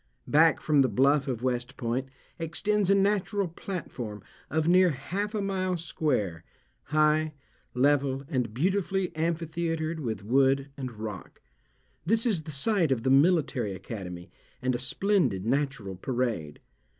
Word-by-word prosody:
Back 160 +2 +4
from 150 -2 +3
the 130 - +3
bluff 140 +2 +3
of 125 -3 -3
West 125 +1 -2
Point 125 +2 -2 0.3
extends 195 +5 0
a 200 - +6
natural 200 0 +1
platform 155 - -6 0.3
of 160 +2 0
near 180 +1 +6
half 195 - -3
a 210 - -1
mile 185 -2 -1
square, 125 - -1 0.4
high, 155 +1 +2 0.4
level, 135 0 +2
and 125 -6 -1
beautifully 190 - 0
amphitheatred 165 0 -2
with 110 -8 -4
wood 135 +4 +2
and 130 -3 -5
rock. 105 -4 -7 0.6
This 225 - +2
is 205 -9 +1
the 155 - -10
site 165 +2 +2
of 120 -4 0
the 130 - +2
Military 140 - +3
Academy, 90 -3 -7 0.3
and 130 0 0
a 120 - -2
splendid 130 - +1
natural 135 -6 -1
parade. 115 - -2
145 Hz, 140 wpm, -28 LUFS, 125-170 Hz, 0.6 s, a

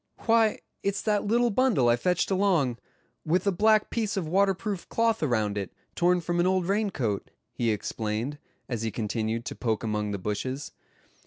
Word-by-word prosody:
"Why, 225 -2 +4 0.2
it's 200 0 -1
that 210 -2 +1
little 240 +2 +3
bundle 215 - +3
I 120 - +5
fetched 180 +10 0
along, 175 -11 +2 0.4
with 175 +5 +1
a 200 - +3
black 215 +3 +3
piece 215 -4 -1
of 175 -5 -1
waterproof 195 +2 0
cloth 230 -1 +1
around 110 -8 0
it, 95 -4 -5 0.2
torn 180 +1 +2
from 175 +1 -1
an 175 - +3
old 185 -1 +2
rain 205 +3 +1
coat," 110 - -2 0.2
he 120 - -1
explained, 110 +5 -2 0.3
as 120 -4 -3
he 115 - -1
continued 110 +2 -2
to - - -5
poke 115 -3 -1
among 105 -1 -1
the 100 - -2
bushes. 130 +9 -3
170 Hz, 175 wpm, -27 LUFS, -, 0.4 s, I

